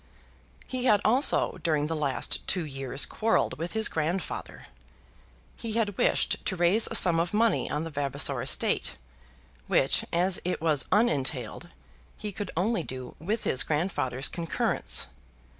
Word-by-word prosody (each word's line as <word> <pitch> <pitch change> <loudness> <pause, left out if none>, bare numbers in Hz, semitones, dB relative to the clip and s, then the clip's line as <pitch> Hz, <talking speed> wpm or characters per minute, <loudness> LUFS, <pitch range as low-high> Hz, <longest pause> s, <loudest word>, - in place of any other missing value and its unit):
He 255 -1 -4
had 210 -5 +5
also 250 +6 +3
during 155 -4 0
the 160 +1 -2
last 145 -3 -1
two 180 -4 -1
years 135 -1 -1
quarrelled 220 -10 0
with 170 +2 -4
his 220 -1 +4
grandfather. 165 +4 -4 0.9
He 230 -2 -6
had 215 -3 -1
wished - - +1
to 190 - 0
raise 180 +6 +4
a - - -3
sum 170 -2 +5
of 170 +4 -1
money 225 +1 +2
on 150 +2 -2
the 165 - -6
Vavasor 140 -2 0
estate, - - +1 0.7
which, - - +2
as 180 +2 +1
it 180 - -2
was 155 -3 +1
unentailed, 150 - 0 0.5
he 210 -1 -5
could 200 0 -6
only 200 +2 +1
do 130 -4 -8
with 210 +8 -3
his 130 - +3
grandfather's 150 -5 -1
concurrence. 170 -2 0
170 Hz, 145 wpm, -27 LUFS, 150-210 Hz, 0.9 s, had